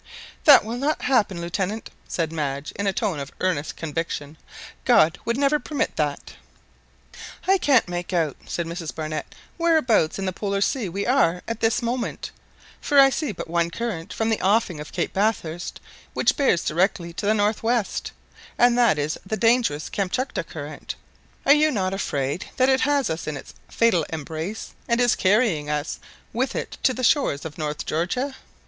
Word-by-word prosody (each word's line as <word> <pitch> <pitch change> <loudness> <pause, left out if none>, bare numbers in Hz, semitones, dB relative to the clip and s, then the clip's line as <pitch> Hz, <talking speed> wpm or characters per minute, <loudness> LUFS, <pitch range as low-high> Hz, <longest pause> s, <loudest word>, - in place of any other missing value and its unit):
"That 285 -8 +9
will 230 +2 -4
not 290 +4 -1
happen, 210 -9 +2
Lieutenant," 190 +5 -3 0.2
said 165 -2 -2
Madge 145 -2 -3
in 200 +1 -3
a - - +3
tone 190 -5 -1
of 140 -1 -6
earnest 180 -5 -1
conviction; 160 -2 -4 0.5
"God 160 +2 +4
would 235 +2 0
never 285 +2 +3
permit 295 -2 -2
that." 150 -2 -2 1.1
"I 385 0 +4
can't 270 - +4
make 175 +1 -4
out," 165 -6 +1
said 170 - -2
Mrs 165 -1 -5
Barnett, 155 -1 -5 0.2
"whereabouts 305 - +3
in 195 - -3
the 185 - -1
Polar 200 +1 -2
Sea 210 0 0
we 200 +4 -3
are 210 -9 +2
at 230 -1 -3
this 225 +1 +1
moment; 240 +1 -3 0.5
for 290 -1 +4
I 270 0 +8
see 295 -2 -1
but 185 - -7
one 170 0 +1
current 175 -4 -4
from 225 0 -1
the 220 - 0
offing 195 -5 +2
of 150 - -8
Cape 175 - -2
Bathurst 190 -5 -1 0.4
which - - +3
bears 265 - +2
directly 170 0 0
to 200 +4 -3
the 215 - +4
north 210 +1 +1
west, 230 -2 -1 0.5
and 245 0 +5
that 235 -10 +4
is 150 +1 -2
the 215 +3 -3
dangerous 225 -11 +2
Kamtchatka 200 +7 -2
Current. - - -7 0.5
Are 280 - +8
you 305 +1 +4
not 190 -8 -1
afraid 145 -4 -2
that 255 +1 +4
it 265 0 +3
has 285 - +2
us 160 +1 -4
in 150 -2 -3
its - - -11 0.2
fatal 225 -8 +3
embrace, 160 +6 -5
and 235 0 +2
is 245 -1 +4
carrying 190 -7 +2
us 150 0 -2 0.3
with 255 +3 -1
it - - -5
to 255 - +2
the 255 - -4
shores 230 - +2
of 155 -1 -7
North 150 -1 -3
Georgia?" 250 - -1
195 Hz, 180 wpm, -24 LUFS, 165-240 Hz, 1.1 s, That